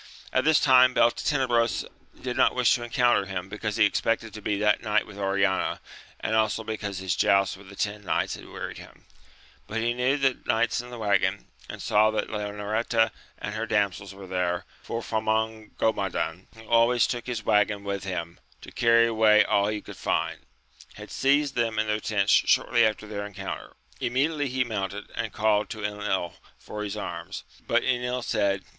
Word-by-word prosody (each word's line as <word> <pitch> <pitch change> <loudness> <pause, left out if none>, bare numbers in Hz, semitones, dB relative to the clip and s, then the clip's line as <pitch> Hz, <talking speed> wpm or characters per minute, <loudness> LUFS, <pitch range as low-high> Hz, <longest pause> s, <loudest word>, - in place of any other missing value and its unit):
At - - +2
this 160 0 +5
time 130 -2 +6
Beltenebros 120 -1 +2 0.3
did - - -4
not - - +3
wish - - +4
to 120 - -1
encounter 120 -4 +2
him, 95 -1 -5
because 105 +1 -3
he 110 - +6
expected 115 +2 0
td 105 - -9
be 105 -1 0
that 105 +1 +2
night 110 -2 +1
with 100 -1 -11
Oriana, 100 0 +1 0.4
and 110 - -1
also 110 0 +1
because 105 -3 -4
his 95 -2 -1
joust 100 -1 +3
with 95 0 -14
the 100 - -11
ten 105 +1 -3
knights 90 - 0
had - - -9
wearied - - -7
him; - - -15 0.6
but 115 - -3
he 120 +1 +1
knew 125 +3 +1
the 135 -2 +1
knights 120 +1 +1
in 120 - -11
the 120 - -8
waggon, 100 -2 +1 0.2
and - - -7
saw 105 +1 +4
that 110 -1 -2
Leonoreta 110 +2 0 0.3
and 105 - -5
her 110 +1 -3
damsels 100 -2 0
were 95 0 -11
there, 90 -1 -1 0.2
for 115 0 -5
Famongomadan, 110 -5 -1
who 110 - -13
al 115 0 +5
ways 120 -1 +3
took 120 -1 -4
his 115 -4 -4
waggon 105 -1 +2
with 100 -1 -3
him 85 -3 -5 0.2
to - - -11
carry 115 0 +4
away 110 -2 +5
all 100 0 +2
he 105 0 -2
could - - -11
find, - - -1 0.6
had - - -10
seized 140 +1 +2
them 115 -2 0
in 110 - +2
their 105 0 0
tents 100 -1 0
shortly 120 - +4
after 110 0 -4
their 105 -1 -5
encounter. 100 -1 -7 0.3
Immediately 140 +4 0
he 130 0 +1
mounted, 105 -3 -4
and 115 - -3
called 105 -1 +1
to 110 - -6
£nil 105 -4 -2 0.2
for 105 - -7
liis 105 0 -4
arms: 85 +1 -6 0.2
but 120 0 +2
Enil 125 -1 -1
said. 100 -4 0
110 Hz, 185 wpm, -26 LUFS, 100-115 Hz, 0.6 s, time